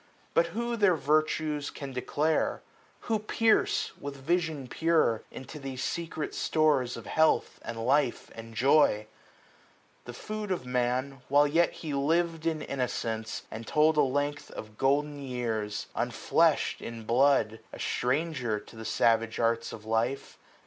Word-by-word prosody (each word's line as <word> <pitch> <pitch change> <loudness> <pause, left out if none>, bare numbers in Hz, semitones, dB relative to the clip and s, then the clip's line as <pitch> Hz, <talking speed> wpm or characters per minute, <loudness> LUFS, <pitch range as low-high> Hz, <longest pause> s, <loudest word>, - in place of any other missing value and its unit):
But 170 0 +4
who 235 +7 -2
their 205 -5 +4
virtues 150 0 0
can 140 -2 -7
declare? 150 +5 0 0.4
who 225 -2 0
pierce. 220 +1 +2
With 140 0 -6
vision 160 -1 -1
pure, 160 -6 +2
into 140 +3 -9
these 135 -2 -5
secret 165 -2 -3
stores 145 -6 +1
Of 115 - -9
health, 160 +7 +2
and 115 0 -5
life, 135 -1 +1
and 115 0 -10
joy? 130 -4 +4 1.0
The 120 - -7
food 215 - -5
of 180 -9 -2
Man, 125 0 +1 0.3
235 - - -22
While 145 +1 +6
yet 165 +4 +3
he 155 -3 -6
liv'd 165 +3 +1
in 155 -2 -1
innocence, 115 -4 -3
and 110 0 -7
told 155 +1 +4
A 150 - +5
length 145 +2 -1
of 110 -1 -9
golden 145 +4 +1
years; 115 -5 -3
unfleshM - - +1
in 115 -1 -7
blood, 120 -1 +3
A - - -9
stranger 130 -4 -1
to 105 - -15
the 110 - -8
savage 115 0 +2
arts 115 0 +1
of 110 - -9
life. 115 +5 -1
140 Hz, 145 wpm, -29 LUFS, 115-155 Hz, 1.0 s, While